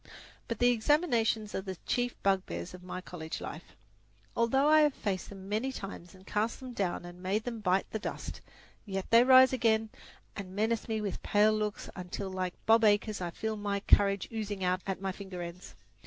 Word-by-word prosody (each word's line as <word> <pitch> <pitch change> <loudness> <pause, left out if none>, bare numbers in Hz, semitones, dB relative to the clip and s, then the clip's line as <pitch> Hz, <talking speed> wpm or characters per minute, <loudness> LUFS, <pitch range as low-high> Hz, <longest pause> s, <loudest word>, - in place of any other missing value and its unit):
But 230 - -3
the 245 0 +4
examinations 230 -4 +2
are - - -1
the 190 -1 -5
chief 245 0 0
bugbears 185 - 0
of 180 - -10
my 185 0 -6
college 160 -3 -6
life. - - -8 0.6
Although 265 +5 +3
I 310 0 +7
have 295 -2 +3
faced 190 -3 -3
them 195 -1 -10
many 220 +6 -1
times 195 -6 -8
and 190 0 -17
cast 215 +3 -1
them 255 -2 -8
down 185 -5 -2
and 175 0 -10
made 195 +4 0
them 235 -1 -4
bite 190 -2 +1
the 220 - -2
dust, - - -6 0.4
yet 195 -2 -5
they 230 +1 +8
rise 260 0 +7
again 225 -3 +2 0.4
and 190 -2 -7
menace 220 +2 0
me 220 -1 -1
with 200 -3 -4
pale 210 +1 +4
looks, 210 -1 -2
until 185 +1 -5
like 185 -1 -3
Bob 225 +1 +5
Acres 210 -1 +3
I 175 - -2
feel 220 +6 -3
my 205 -1 -1
courage 200 -1 +4
oozing 205 -3 -3
out 180 +1 +1
at 190 -1 -3
my 195 -1 -1
finger 185 -2 -7
ends. 170 +2 -9
205 Hz, 195 wpm, -31 LUFS, 185-225 Hz, 0.6 s, they